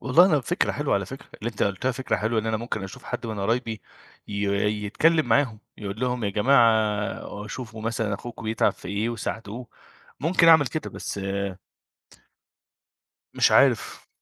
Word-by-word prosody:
والله 150 +8 +6
أنا 155 -6 +3
فكرة 125 - 0
حلوة - - 0
على - - 0
فكرة، - - -9
اللي 115 +3 -3
أنت 105 - -4
قُلّتها 100 +6 0
فكرة 130 +3 -1
حلوة 110 +1 0
إن 110 - -6
أنا 110 0 +1
ممكن 115 -2 -4
أشوف 95 - -10
حد - - -4
من 110 -2 -4
قرايبي 115 +1 -1 0.5
ي 105 - -5 0.5
يتكلّم 160 +9 +3
معاهم، 120 -2 +2 0.2
يقول 100 +1 -6
لهم 125 -3 -1
يا 100 - 0
جماعة 110 -3 +2
شوفوا 110 0 -7
مثلًا 115 -2 -1
أخوكم 115 +3 -8
بيتعب 110 +1 +2
في - - -11
إيه 105 +3 -1
وساعدوه، 115 0 -5 0.5
ممكن 165 +3 +4
أعمل 160 -3 +7
كده، 155 +5 -4
بس 100 - -5 2.1
مش - - +4
عارف - - +3
115 Hz, 160 wpm, -25 LUFS, 105-125 Hz, 2.1 s, أعمل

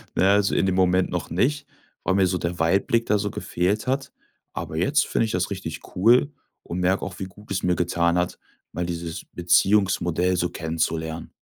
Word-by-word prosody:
Na - - +2
ja, 95 +1 +5
also, 100 -1 +2
in - - +2
dem 95 -1 +1
Moment 90 0 +3
noch 90 -3 -3
nicht, 140 - 0 0.4
weil 95 - +1
mir 95 -1 +4
so 90 0 0
der 85 0 -3
Weitblick 100 +8 +2
da 105 - +2
so 105 0 -2
gefehlt 100 +7 -1
hat. 135 +2 -1 0.4
Aber - - -6
jetzt - - +2
finde - - +1
ich 110 - -3
das 90 0 -1
richtig 95 -5 -5 0.2
cool 120 +9 +4 0.3
und 85 - -5
merke 90 +2 +1
auch, - - -8
wie - - -3
gut 100 +3 -15
es 95 - -1
mir 90 0 +2
getan 85 0 +1
hat, 90 0 -1 0.4
mal 90 - -2
dieses 85 -1 -5
Beziehungsmodell 90 -1 +2
so 85 0 0
kennenzulernen. 80 0 -3
90 Hz, 200 wpm, -24 LUFS, 85-100 Hz, 0.4 s, ja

